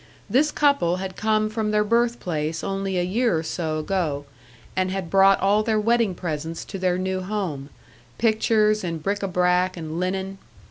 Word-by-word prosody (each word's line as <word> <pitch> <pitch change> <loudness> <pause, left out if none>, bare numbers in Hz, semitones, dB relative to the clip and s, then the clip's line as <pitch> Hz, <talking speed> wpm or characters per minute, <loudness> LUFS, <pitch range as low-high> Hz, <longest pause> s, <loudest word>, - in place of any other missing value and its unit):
This 300 +4 +2
couple 280 - +2
had 185 0 -5
come 215 0 +1
from 215 0 -2
their 210 0 +2
birth 235 +2 +1
place 160 -1 -3
only 195 -1 -2
a 175 - +1
year 210 +1 +1
or 160 - -2
so 160 -1 -2
ago, 155 -4 -2 0.5
and 185 0 +1
had 185 -3 -4
brought 195 0 +5
all 205 +2 +3
their 215 0 +1
wedding 230 -3 +2
presents 165 -1 -4
to 195 - -7
their 180 -1 +1
new 185 0 -2
home 185 -8 -4 0.5
pictures 215 -1 +2
and 165 -3 -4
bric 200 +3 -1
a 195 - -1
brac 180 0 +1
and 160 0 -5
linen. 190 +1 -3
190 Hz, 180 wpm, -24 LUFS, 175-215 Hz, 0.5 s, brought